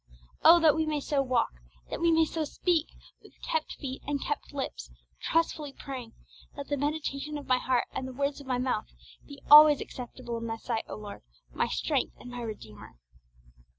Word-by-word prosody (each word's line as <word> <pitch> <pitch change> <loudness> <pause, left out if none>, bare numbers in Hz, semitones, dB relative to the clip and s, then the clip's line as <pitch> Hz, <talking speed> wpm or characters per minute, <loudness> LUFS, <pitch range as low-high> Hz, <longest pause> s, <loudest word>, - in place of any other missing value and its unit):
Oh 340 +1 +9
that 310 -2 +6
we 320 0 0
may 305 -1 0
so 285 0 0
walk, 255 - +1 0.4
that - - -4
we 335 0 +4
may 325 0 +5
so 320 0 -2
speak, 325 +2 0 0.3
with - - -19
kept 485 -1 -1
feet 265 -2 -6
and 285 -1 0
kept 290 +2 -4
lips, 265 - -5 0.3
trustfully 310 -3 0
praying, 255 -5 -7 0.4
'Let 280 - -6
the 290 - +1
meditation 295 0 -2
of 290 - -8
my 255 -1 +3
heart 250 -1 +1
and 260 - -4
the - - -6
words 280 +2 -2
of 275 - -13
my 255 -1 0
mouth 250 -4 -1 0.4
be 280 -1 -12
alway 300 0 +11
acceptable 240 -1 -6
in 230 - -5
Thy 225 0 -3
sight, 225 -1 -3
O - - -6
Lord, 210 -1 -9 0.3
my - - +1
Strength - - -1
and 245 - -10
my 245 0 -6
Redeemer!' 110 - -9
275 Hz, 190 wpm, -29 LUFS, 245-300 Hz, 0.4 s, alway